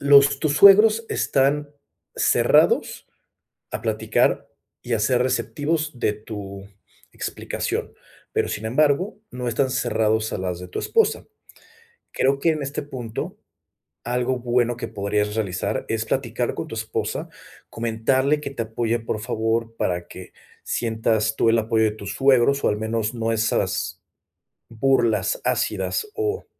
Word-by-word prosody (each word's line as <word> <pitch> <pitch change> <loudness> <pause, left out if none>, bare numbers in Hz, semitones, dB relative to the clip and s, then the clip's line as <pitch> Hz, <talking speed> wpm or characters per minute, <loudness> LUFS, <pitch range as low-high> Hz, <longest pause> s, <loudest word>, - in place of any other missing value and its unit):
los 140 0 +6
tus 150 -2 +1
suegros 215 +5 +7
están 145 +2 +1 0.4
cerrados - - +3 0.6
a - - -4
platicar - - +1 0.3
y 120 - -5
a 115 - 0
ser 125 +3 +2
receptivos 150 +2 -1
de 105 - +1
tu 100 -2 -8 0.5
explicación, - - -4 0.4
pero, - - 0
sin 105 - -4
embargo, 150 - +1
no 125 -1 -4
están 130 +3 0
cerrados 110 -3 0
a - - -2
las 90 -1 -3
de 90 - -8
tu - - -5
esposa. 450 -1 +1 0.9
Creo 135 +1 +1
que, 165 - +2
en 155 -2 0
este 140 +2 -3
punto, 125 -6 -6 0.7
algo 125 +1 0
bueno 120 -1 0
que 115 - -4
podrías 105 0 -1
realizar 95 -5 -2
es - - -1
platicar - - -1
con - - -4
tu - - -7
esposa, - - -3 0.4
comentarle 130 +6 +1
que 140 - -5
te 130 -4 -3
apoye, 115 +1 -1
por 110 -1 -3
favor, 115 +1 -1
para 90 -5 -2
que - - -11 0.3
sientas 110 -1 0
tú 115 - +3
el 115 - +4
apoyo 110 0 +2
de 105 - +2
tus 100 -2 -7
suegros 135 0 +3
o - - +3
al 105 - 0
menos 110 +1 -2
no 115 -1 -1
esas 110 0 -1 0.7
burlas 120 - +1
ácidas 430 - -1
o 430 0 -2
120 Hz, 140 wpm, -23 LUFS, 110-140 Hz, 0.9 s, suegros